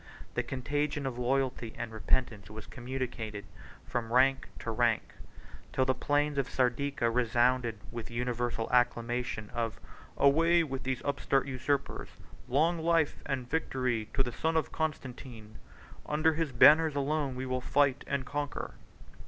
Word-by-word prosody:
The - - +1
contagion 145 +2 -2
of 125 -2 -3
loyalty 125 -2 -1
and 120 -1 -4
repentance 110 -2 -1
was 110 0 -8
communicated 120 -5 -5 0.4
from 115 -2 -3
rank 135 +2 +4
to 115 - -4
rank; 115 -1 +1 0.6
till 130 - +2
the 130 - +3
plain 145 +1 +1
of 135 - -1
Sardica 130 -1 +1
resounded 120 -1 +2
with 115 -1 -6
the 115 - -10
universal 120 -1 -1
acclamation 120 -2 0
of 115 -3 -2 0.4
"Away 165 +4 +5
with 135 -3 -4
these 130 -1 -2
upstart 140 -1 +1
usurpers! 135 +1 -2 0.4
Long 160 +6 +2
life 165 -2 +2
and 130 -3 -2
victory 125 -6 -1
to 135 - +3
the 120 - -3
son 160 +6 0
of 160 - 0
Constantine! 125 -8 -5 0.5
Under 155 +2 +2
his 160 -2 -1
banners 150 +5 +7
alone 140 -1 0
we 130 +1 -4
will 130 0 -1
fight 140 +1 +2
and 140 -1 -1
conquer." 145 0 -4
130 Hz, 145 wpm, -31 LUFS, 120-145 Hz, 0.6 s, banners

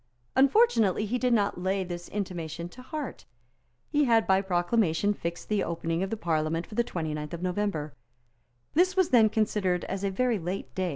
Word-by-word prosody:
Unfortunately 265 - +4
he 245 +4 -1
did 250 0 +1
not 200 -5 +1
lay 190 +1 0
this 175 -1 -7
intimation 170 -5 -4
to 255 - -13
heart. 295 +2 -6 0.7
He 295 0 +3
had 230 -3 +4
by 190 0 +3
proclamation 190 0 +1
fixed 170 -3 -5
the 210 -2 +1
opening 165 0 -2
of 190 - -1
the 225 - -3
Parliament 165 -2 -1
for - - -13
the 240 +2 +2
29th 155 -7 -4
of 170 +1 -5
November. 180 -5 -2 0.8
This 365 +4 +3
was 375 -3 +4
then 225 -4 +6
considered 205 -5 0
as 195 +1 -4
a 200 - +1
very 235 +2 +1
late 180 +3 -5
day. 185 -1 -1
195 Hz, 180 wpm, -28 LUFS, 170-225 Hz, 0.8 s, then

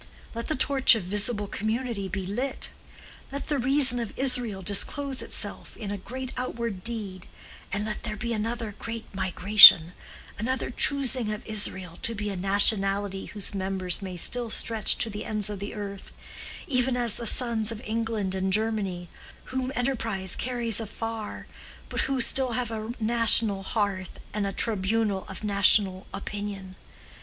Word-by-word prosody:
Let 230 0 -5
the 310 - -1
torch 265 -1 +4
of 220 - -3
visible 205 +3 +1
community 220 0 -3
be 190 0 -5
lit! 245 +8 -3 0.6
Let 280 +2 -6
the 290 -2 0
reason 260 -1 +4
of 230 -3 -6
Israel 245 -7 0
disclose 265 +8 +1
itself - - -5
in 205 -2 -6
a 205 - -4
great 255 +6 -7
outward 235 -6 -4
deed, 205 -6 -6 0.4
and 205 +2 -2
let 215 -1 -4
there 215 -2 -5
be 235 +3 -4
another 225 0 -4
great 230 -1 -6
migration, 190 -2 +8 0.5
another 260 +4 -2
choosing 260 -4 +4
of 210 +2 -7
Israel 190 -5 -3
to 230 - -1
be 210 0 -4
a - - -5
nationality 195 0 +3
whose 205 -1 -4
members 190 -2 -1
may 185 -2 -7
still 240 +6 +1
stretch 220 0 +2
to 225 - +1
the 210 - -6
ends 210 -1 -3
of 205 - -6
the 200 +2 -7
earth, 200 -2 -8 0.5
even 255 -5 0
as 240 -3 0
the 235 - -5
sons 230 -3 0
of 225 - -6
England 220 -3 -3
and 190 0 -2
Germany, 200 -4 -1 0.5
whom 260 0 -2
enterprise 225 -7 -1
carries 240 -3 -2
afar, 225 0 -6 0.4
but - - -2
who 270 -1 -1
still 255 0 +2
have 245 -1 -2
a 220 0 -5
national 225 -3 +4
hearth 195 -2 -3
and 205 -1 -2
a - - -3
tribunal 210 -1 0
of 190 - -9
national 200 -2 +3
opinion. 200 -2 -7
215 Hz, 155 wpm, -26 LUFS, 195-235 Hz, 0.6 s, migration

